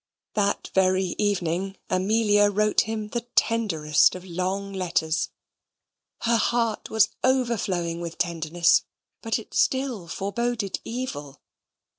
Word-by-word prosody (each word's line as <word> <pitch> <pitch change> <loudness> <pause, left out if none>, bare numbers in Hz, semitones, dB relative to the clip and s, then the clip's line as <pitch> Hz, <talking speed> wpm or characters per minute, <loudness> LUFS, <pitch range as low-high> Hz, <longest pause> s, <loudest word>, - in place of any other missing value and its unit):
That 200 -1 0
very 185 -1 +2
evening 195 -1 -1
Amelia 205 +2 +3
wrote 210 +1 +2
him 215 -1 -3
the 235 +1 -4
tenderest 165 -12 +3
of 185 0 -9
long 190 +3 -3
letters. 170 -3 0 0.9
Her 235 0 +3
heart 230 -1 0
was 220 -3 +4
overflowing 205 -10 0
with 170 -1 -6
tenderness, 170 0 +2 0.4
but 225 -1 0
it 225 - -11
still 260 -9 0
foreboded 205 +2 -2
evil. 155 - -6
200 Hz, 110 wpm, -25 LUFS, 175-225 Hz, 0.9 s, was